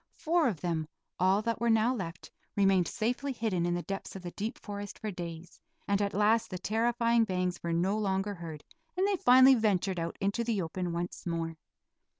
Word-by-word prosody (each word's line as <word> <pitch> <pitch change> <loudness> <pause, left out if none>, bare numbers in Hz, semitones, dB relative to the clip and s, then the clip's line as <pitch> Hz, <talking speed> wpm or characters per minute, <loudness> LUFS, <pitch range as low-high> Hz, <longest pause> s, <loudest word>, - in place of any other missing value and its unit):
Four 330 -1 +2
of 195 -11 -2
them, 165 -3 -1 0.3
all 190 +3 +3
that 230 0 -2
were 235 - +2
now 225 +2 +4
left, 170 -8 -6 0.2
remained 195 -3 +3
safely 250 +5 -1
hidden 210 -8 -1
in 175 - 0
the 175 - -3
depths 195 0 -5
of 190 - -8
the 175 - -5
deep 215 +5 -4
forest 205 -1 -7
for 215 - -4
days, 170 -1 -8 0.3
and 200 0 +2
at 200 -1 -1
last 215 +2 +3
the 185 - -4
terrifying 230 +3 +2
bangs 180 -3 -1
were 170 - -2
no 180 +5 +1
longer 195 0 0
heard, 165 -5 -8 0.3
and 380 +2 +3
they 400 -2 +1
finally 260 -2 +7
ventured 195 -6 +1
out 165 0 -4
into 200 +4 0
the 230 -3 0
open 175 +1 -3
once 175 +1 -4
more. 165 -1 -2
195 Hz, 195 wpm, -30 LUFS, 175-225 Hz, 0.3 s, finally